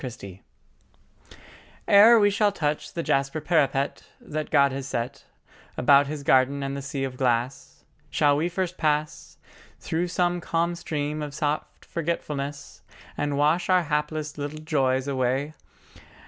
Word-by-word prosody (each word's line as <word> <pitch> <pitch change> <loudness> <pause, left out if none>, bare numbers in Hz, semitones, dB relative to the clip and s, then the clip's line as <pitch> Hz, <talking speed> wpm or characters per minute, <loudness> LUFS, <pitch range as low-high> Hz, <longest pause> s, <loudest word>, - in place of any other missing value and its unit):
LIV 125 -3 -5
LETHE 95 -1 -10 1.5
ERE 220 +3 +8
we 205 -1 +4
shall 205 +1 +2
touch 150 -6 -3
the 170 - -3
jasper 135 +3 0
parapet, 140 -4 0 0.2
That 155 0 -5
God 140 -2 +4
has 135 0 -5
set 125 +2 -4 0.5
About 140 +2 +5
His 145 0 -5
garden 140 +1 +3
and 135 0 -3
the 140 - -4
sea 135 0 -4
of 130 -1 -4
glass, 125 0 -2 0.3
Shall 145 -1 +3
we 160 +4 0
first 180 0 -3
pass 150 - -1 0.4
Through 170 +2 -2
some 175 0 0
calm 170 +1 0
stream 150 -2 -3
of 145 -1 -6
soft 150 0 -3
forgetfulness 150 -4 -4 0.3
And 145 -1 -2
wash 160 +5 +2
our 185 -1 +4
hapless 150 0 -3
little 145 +2 -5
joys 135 -4 0
away? 135 +2 -1
145 Hz, 145 wpm, -25 LUFS, 135-165 Hz, 1.5 s, ERE